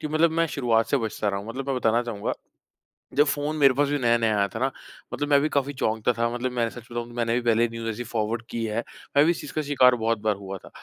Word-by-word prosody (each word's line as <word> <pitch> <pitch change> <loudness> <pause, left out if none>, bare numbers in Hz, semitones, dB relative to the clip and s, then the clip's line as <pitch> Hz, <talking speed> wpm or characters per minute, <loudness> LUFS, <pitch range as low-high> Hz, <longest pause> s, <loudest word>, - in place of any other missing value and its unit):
कि 155 - -3
मतलब 155 +2 +3
मैं 165 +1 +1
शुरुआत 120 -7 +1
से - - +4
बचता 110 -4 -2
रहा 100 0 -1
हूँ। 100 - -10
मतलब 135 +4 -5
मैं 135 - 0
बताना 115 -1 +2
चाहूँगा 115 -4 -3 0.9
जब 145 - +6
फ़ोन 145 +1 -1
मेरे 140 -3 +6
पास 145 +2 +2
भी 145 - +1
नया-नया 115 -3 +2
आया 100 0 +2
था 110 - -6
ना, 135 +2 +1 0.4
मतलब 145 0 -2
मैं 140 -1 +6
भी 155 - +1
काफ़ी 140 0 0
चौंकता 110 -2 0
था। 115 0 +1
मतलब 125 +1 -2
मैं 120 -2 0
सच 120 - -10
बताऊँ 120 0 -4
तो - - -12
मैंने 115 -1 0
भी 125 - +1
पहले 120 0 +3
न्यूज 115 0 -6
ऐसी 115 +2 -4
फॉरवर्ड 110 0 -1
की 115 - -3
है, 110 +2 -2 0.3
मैं 145 - +7
भी 170 - +4
इस 170 - -4
चीज़ 140 - -8
का 155 - 0
शिकार 130 -4 +4
बहुत 115 -1 0
बार 105 0 0
हुआ 95 0 -7
था। - - -15
120 Hz, 275 wpm, -25 LUFS, 115-140 Hz, 0.9 s, मैं